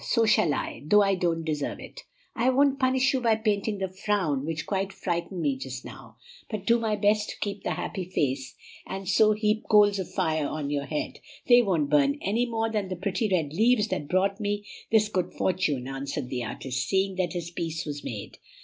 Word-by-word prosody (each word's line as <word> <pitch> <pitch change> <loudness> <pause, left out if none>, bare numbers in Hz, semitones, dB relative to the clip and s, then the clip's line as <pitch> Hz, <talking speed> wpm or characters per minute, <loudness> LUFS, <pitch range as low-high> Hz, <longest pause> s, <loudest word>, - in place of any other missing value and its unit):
So 230 -2 +2
shall 210 -7 +4
I, - - -4
though 205 +8 +5
I 195 0 +2
don't 170 -3 0
deserve 150 -3 -2
it." - - -11 0.3
"I 245 +2 +2
won't 275 +1 +3
punish 260 0 +3
you 260 - 0
by 230 -2 +3
painting 215 -1 0
the 190 0 -2
frown 185 -7 -1
that 160 0 -3
quite 195 0 -1
frightened 175 -1 -3
me 280 - +1
just 265 - -7
now, - - -11 0.3
but 215 -4 -4
do 235 0 +4
my 220 -2 0
best 210 +1 +2
to - - -7
keep 200 -1 -3
the - - -1
happy 190 -3 -4
face, 135 -7 -2 0.3
and 190 0 -5
so 215 +3 +5
heap 210 +1 0
coals 205 -2 +5
of 185 - -5
fire 160 -5 0
on 145 -1 -3
your 145 -1 -1
head. 150 - -3 0.3
They 245 -1 +8
won't 165 -10 0
burn 140 -1 +4
any 225 +5 0
more 225 -1 -1
than 210 -4 -1
the 185 - -3
pretty 195 +4 -1
red 160 -6 0
leaves 220 +3 +3
that 145 - -2
brought 195 +4 +1
me 205 0 -2 0.3
this 215 -1 +4
good 185 -4 -2
fortune," 160 -9 0
answered 135 0 -4
the 125 -2 -3
artist, 125 +2 -3
seeing 190 0 +1
that 185 -1 0
his 170 -1 -4
peace 165 -2 -3
was 145 -1 -5
made. 105 -4 -7
190 Hz, 210 wpm, -27 LUFS, 155-215 Hz, 0.3 s, They